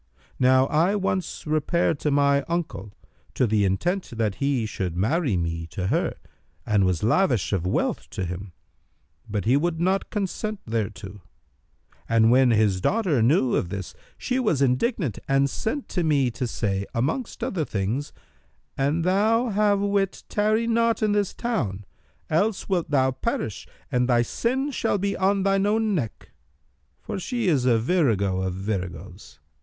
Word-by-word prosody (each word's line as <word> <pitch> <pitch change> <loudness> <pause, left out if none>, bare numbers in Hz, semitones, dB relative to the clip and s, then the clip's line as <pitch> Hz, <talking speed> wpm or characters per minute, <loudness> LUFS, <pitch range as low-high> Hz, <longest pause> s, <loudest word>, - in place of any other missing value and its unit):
Now 130 +1 +5
I 165 +8 +2
once 185 -3 -2
repaired 155 +1 +1
to 150 - 0
my 140 0 +3
uncle, 170 -11 -3 0.4
to 130 - +3
the 105 -2 +2
intent 175 - -1
that 110 -3 0
he 140 -5 +1
should 95 -5 -4
marry 125 - +1
me 85 -1 -3
to 85 +3 -4
her, - - 0 0.5
and 105 -3 +2
was 90 -1 -1
lavish 120 - +2
of 90 -2 0
wealth - - -1
to 95 - -4
him; 90 +2 -6 0.8
but 105 -3 -2
he 120 +4 +4
would 165 +3 0
not 190 +3 0
consent 210 +1 -3
thereto: 105 -3 -4 0.9
and 115 0 +4
when 130 0 +5
his 105 -5 +2
daughter 185 - +1
knew 130 +1 +3
of 85 - 0
this 95 -1 -6 0.2
she 255 0 -1
was 210 - +1
indignant 135 - 0
and 135 0 +2
sent 275 +5 -3
to 175 - -1
me 140 -5 +2
to 125 +2 -3
say, 100 -4 -2
amongst 155 - -2
other 175 -5 -1
things, 110 +4 -2 0.7
'An 145 +5 +1
thou 220 +6 +2
have 205 -1 +2
wit, 200 -1 0
tarry 215 +2 +1
not 230 -1 +1
in 215 - +2
this 205 -2 +1
town; 105 - -3 0.4
else 195 +6 0
wilt 180 -4 0
thou 130 -2 +3
perish 115 -5 -3 0.2
and 125 0 +1
thy 120 -1 +4
sin 260 - -1
shall 235 - 0
be 200 +1 -1
on 195 +1 +1
thine 195 0 +2
own 220 0 +1
neck.[FN#305]' 70 - -8
For - - -4
she 235 +2 -2
is 140 -8 +2
a 120 -3 +4
virago 110 - +1
of 95 -1 -2
viragoes. 95 -2 -5
140 Hz, 160 wpm, -24 LUFS, -, 0.9 s, Now